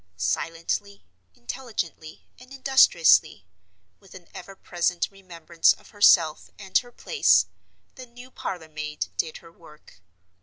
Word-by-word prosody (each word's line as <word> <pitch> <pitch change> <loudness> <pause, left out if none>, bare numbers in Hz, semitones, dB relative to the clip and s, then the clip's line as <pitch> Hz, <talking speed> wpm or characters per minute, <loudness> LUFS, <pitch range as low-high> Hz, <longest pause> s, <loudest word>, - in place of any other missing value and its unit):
Silently, 165 - -3 0.3
intelligently, 170 - -7
and 250 +1 -17
industriously—with 100 - +1
an 180 -2 -14
ever 195 +2 -11
present 175 -1 -2
remembrance 170 -4 0
of - - -20
herself 170 -6 +3
and 190 -3 -13
her 245 -1 -14
place—the 260 - -1
new 245 +2 -15
parlor 175 -9 -6
maid 150 - -5
did 155 - -3
her 165 - -15
work. 150 - -19
170 Hz, 110 wpm, -24 LUFS, 155-205 Hz, 0.3 s, herself